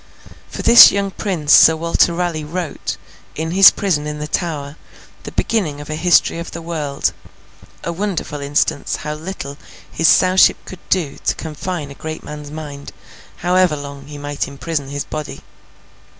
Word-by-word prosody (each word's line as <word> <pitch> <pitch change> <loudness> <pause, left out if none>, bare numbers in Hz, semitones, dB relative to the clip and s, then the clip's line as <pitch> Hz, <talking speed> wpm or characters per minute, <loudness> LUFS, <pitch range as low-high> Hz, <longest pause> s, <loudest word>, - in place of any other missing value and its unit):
For - - -6
this 235 +1 +10
young 200 0 -1
prince 175 -8 0
Sir 160 - +8
Walter 170 +2 +2
Raleigh 170 -2 -2
wrote, 165 0 -5 0.4
in 160 +1 -3
his 190 +2 +9
prison 165 -8 -1
in 150 0 -5
the 150 0 -5
Tower, 150 -4 -3 0.5
the - - -6
beginning 170 -11 -1
of 145 +1 -8
a - - -2
History 170 +1 +3
of 170 - -6
the 170 - -8
World: 150 -4 -2 0.7
a 170 - -3
wonderful 170 -6 -3
instance 145 0 0
how 150 - -2
little 150 -3 -7 0.3
his 165 - +1
Sowship 185 0 +5
could 185 - -10
do 170 -7 -1
to - - +1
confine 160 -1 -5
a - - -8
great 155 +3 -7
man's 150 -1 -8
mind, 145 -2 -8 0.5
however 180 -2 +3
long 140 -1 -9
he 150 0 -9
might 145 0 -4
imprison 140 +1 -4
his 145 0 -4
body. 155 -1 -6
155 Hz, 165 wpm, -18 LUFS, 145-175 Hz, 0.7 s, this